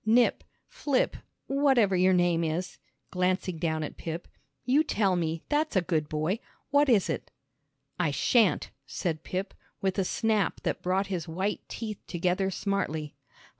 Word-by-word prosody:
"Nip 235 +3 +3 0.2
Flip 280 -3 0 0.3
whatever 265 -8 +3
your 185 +1 +4
name 175 -2 +3
is," 165 +3 -2 0.3
glancing 185 -1 0
down 160 -1 0
at - - -6
Pip, 165 +1 -5 0.4
"you 275 +5 +4
tell 200 -10 +1
me, 165 -2 -1
that's 300 -2 0
a 190 - +5
good 160 -4 0
boy. 155 +7 0 0.3
What 285 0 +4
is 215 -6 +4
it?" - - -3 0.7
"I 175 -3 +2
shan't," 215 - +2 0.2
said 160 -3 -2
Pip, 190 +2 -3 0.3
with 190 0 0
a - - +3
snap 215 +1 0
that - - -2
brought 185 +2 +1
his 175 -2 -3
white 190 +6 -2
teeth 215 -3 -5
together 180 +3 0
smartly. 175 -6 -2
185 Hz, 150 wpm, -28 LUFS, 170-215 Hz, 0.7 s, a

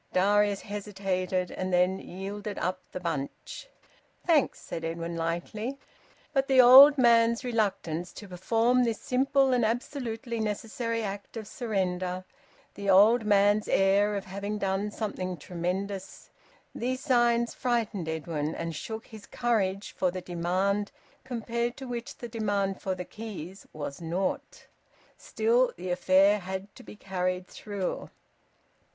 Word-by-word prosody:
Darius 205 +1 +3
hesitated, 195 -3 -2
and 185 0 -3
then 180 +2 +2
yielded 200 +3 -6
up 185 +1 -2
the - - -5
bunch. 165 - -5 0.6
"Thanks," 320 -6 +3
said 165 - -6
Edwin 165 +1 -4
lightly. 175 +10 -3 0.6
But 270 -1 +2
the 265 -2 +4
old 270 +4 +10
man's 235 -1 +4
reluctance 195 -8 -1
to 205 - -10
perform 225 +7 +2
this 230 -3 -1
simple 270 +1 +2
and 245 -1 +2
absolutely 235 0 -2
necessary 225 +2 -2
act 200 +2 -6
of 220 -2 -6
surrender, 185 -5 -2 0.5
the 200 -1 -4
old 215 +5 +6
man's 205 0 +4
air 200 +2 +3
of 200 - -4
having 200 +2 -4
done 195 +1 -1
something 185 -4 -4
tremendous 185 +4 -4 0.4
these 255 +2 -2
signs 240 -3 +2
frightened 225 -9 -1
Edwin 160 -1 -3
and 165 -1 -4
shook 220 +8 -6
his 215 -2 -12
courage 205 -5 0
for 185 - 0
the 185 +1 -5
demand 185 +4 -1 0.3
compared 235 -1 -3
to 265 - -7
which 240 -1 -5
the 240 - -6
demand 205 -4 -1
for 190 -1 -2
the 180 0 -6
keys 195 -4 -8
was 145 0 -6
naught. 175 +4 -3 0.5
Still, 235 +3 +1
the 180 +1 -4
affair 190 +3 +4
had 190 +1 -6
to - - -13
be - - -12
carried 185 -2 -2
through. 200 -1 -5
200 Hz, 135 wpm, -28 LUFS, 185-230 Hz, 0.6 s, old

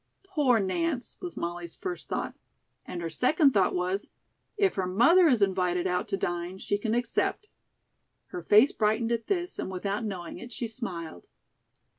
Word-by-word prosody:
"Poor 295 -11 +2
Nance," 255 - -1
was 355 -2 -6
Molly's 170 0 -4
first 360 -2 -6
thought. - - -3 0.5
And 175 -1 -5
her 165 - -2
second 275 - +3
thought 195 -6 +2
was: 185 +3 -1 0.5
"If 400 -2 +3
her 190 -2 -1
mother 330 - +5
is 245 -8 +4
invited 180 -2 +1
out 180 -1 0
to 195 - -1
dine, 175 0 -3
she 205 +1 -1
can 220 +1 0
accept." 245 - -1 0.8
Her 360 - -5
face 220 +3 +6
brightened 220 +2 +1
at 230 -1 -1
this, 355 -2 -2
and - - -3
without 195 +3 -2
knowing 185 -5 -5
it, 240 - -9
she 235 0 -3
smiled. 175 - -6
210 Hz, 165 wpm, -28 LUFS, 180-260 Hz, 0.8 s, face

